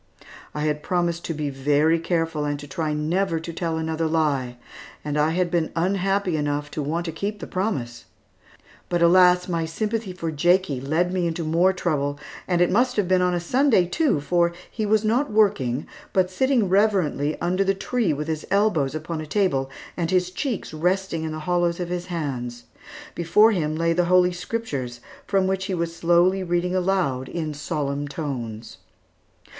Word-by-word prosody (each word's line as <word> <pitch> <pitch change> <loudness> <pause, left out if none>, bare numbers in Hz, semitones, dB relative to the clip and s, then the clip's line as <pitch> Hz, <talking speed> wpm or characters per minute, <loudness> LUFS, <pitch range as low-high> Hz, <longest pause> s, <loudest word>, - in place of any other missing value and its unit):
I 150 - -2
had 150 -1 0
promised 170 0 -1
to 165 - -2
be 150 -1 -2
very 145 +4 +2
careful 165 -2 -1
and 145 -1 -2
to 145 - -9
try 160 -3 -2
never 165 +3 0
to 165 +1 -7
tell 165 -1 -2
another 160 0 -1
lie, 140 -6 0 0.5
and 150 -1 -2
I 150 +1 +3
had 175 +1 0
been 170 -2 0
unhappy 190 0 +1
enough 145 0 -2
to 155 - -3
want 165 +4 -2
to 165 - -3
keep 200 +6 -4
the - - -6
promise. 185 - -3 0.8
But, 175 -1 +1
alas, 180 +1 +5
my 165 -2 -1
sympathy 215 +5 -3
for 170 -3 -4
Jakie 165 -3 +2
led 165 +6 0
me 180 -2 +1
into 165 0 -3
more 170 +4 +3
trouble, 145 -6 -1 0.3
and 175 -1 +1
it 175 - +3
must 250 +5 +2
have 205 -4 +1
been 185 0 +3
on 180 -1 +1
Sunday 240 +1 +3
too, 275 - +1
for 170 +3 +1 0.2
he 215 -2 -2
was 215 +1 +3
not 245 +7 +1
working, 150 - +2 0.3
but 185 -1 +2
sitting 250 +1 +2
reverently 185 -7 +1
under 180 +3 +1
the 195 0 +1
tree 220 -1 0
with 150 +1 -3
his 155 -1 -3
elbows 180 -9 +2
upon 155 +1 -4
a 155 - -7
table, 145 -8 +1 0.3
and 170 -2 -2
his 180 0 +1
cheeks 230 - -3
resting 180 +1 0
in 160 - -3
the 155 0 -5
hollows 175 -1 +1
of 175 -1 -3
his 180 0 -3
hands. 125 -8 -4 0.5
Before 190 +7 +4
him 155 -6 -1
lay 165 +1 +1
the 175 +1 +2
Holy 180 0 +4
Scriptures 175 - -4 0.3
from 195 -2 +2
which 190 0 -1
he 190 -2 -2
was 170 -1 -3
slowly 175 +3 +3
reading 175 0 0
aloud 180 -9 0
in 155 -3 -3
solemn 145 -1 -3
tones. 120 -7 -5
170 Hz, 180 wpm, -24 LUFS, 150-185 Hz, 0.8 s, alas